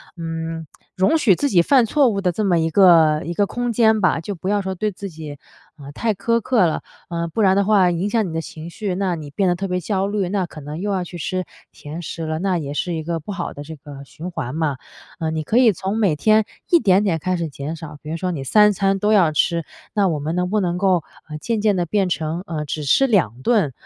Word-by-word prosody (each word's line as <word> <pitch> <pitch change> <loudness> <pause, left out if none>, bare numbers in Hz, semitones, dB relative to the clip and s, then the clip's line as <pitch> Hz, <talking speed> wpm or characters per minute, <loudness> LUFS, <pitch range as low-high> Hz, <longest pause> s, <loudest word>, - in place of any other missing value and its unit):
嗯， 165 -1 -5 0.3
容 190 - +3
许 220 - +4
自 285 - 0
己 175 -5 +5
犯 255 +4 +4
错 285 +3 +3
误 200 -4 0
的 180 - +1
这 210 +4 -2
么 180 -3 +3
一 160 - +1
个 160 -4 +5
一 170 - -3
个 205 +3 +2
空 245 +3 -2
间 220 -1 +4
吧， 180 -4 +2
就 200 +4 -5
不 175 +3 -7
要 205 -1 +1
说 190 0 -3
对 210 +3 -2
自 200 +1 -7
己， 155 -3 -9 0.4
呃， 140 -1 -10
太 220 +9 -1
苛 230 +4 +1
刻 220 -3 +3
了， 160 - -1 0.3
呃， 170 0 -2
不 170 +7 -2
然 190 -1 +4
的 200 - +3
话 195 -4 +4
影 175 +4 -1
响 225 -3 +1
你 160 - -6
的 165 - -1
情 160 +1 -9
绪， 190 +1 -4
那 190 -2 -1
你 155 -3 -8
变 190 +6 0
得 - - +3
特 195 +3 -3
别 180 -1 -1
焦 195 +2 -1
虑， 200 -2 -1
那 195 -2 0
可 155 - -11
能 150 +3 -7
又 205 +2 -2
要 190 -2 0
去 175 0 -9
吃 185 +2 -2 0.3
甜 155 +4 -8
食 165 -1 -6
了， 155 0 -2
那 185 0 0
也 145 -3 -4
是 175 +4 -2
一 160 - -4
个 165 +1 -2
不 160 +7 -8
好 195 -3 -4
的 145 - -9
这 160 +2 -9
个 145 -1 -11
循 170 +6 -8
环 150 -6 -4
嘛。 155 -4 -1 0.4
嗯， 160 -1 -2
你 155 - -2
可 215 - 0
以 245 -3 +6
从 195 +4 -3
每 190 -8 +2
天 215 +7 +3 0.3
一 345 - +6
点 195 - +3
点 175 -6 0
开 185 +4 -1
始 165 -1 -2
减 145 +2 -6
少， 150 -2 -9
比 150 - -9
如 165 - -3
说 180 +2 -2
你 145 -6 -4
3 210 - +5
餐 195 +1 +1
都 210 +2 +1
要 180 -7 +4
吃， 170 +1 +1 0.3
那 205 -2 +2
我 165 -4 0
们 155 +3 -3
能 180 0 0
不 215 +1 +1
能 175 -1 -1
够， 185 -4 +2 0.3
呃， 150 - -5
渐 220 +5 -2
渐 210 -2 +3
地 175 -1 0
变 195 +1 0
成， 165 +1 -2
呃， 155 -2 -3
只 150 +1 -4
吃 145 - +4
2 165 - +1
顿， 200 - +2
180 Hz, 280 characters per minute, -21 LUFS, 160-200 Hz, 0.4 s, 以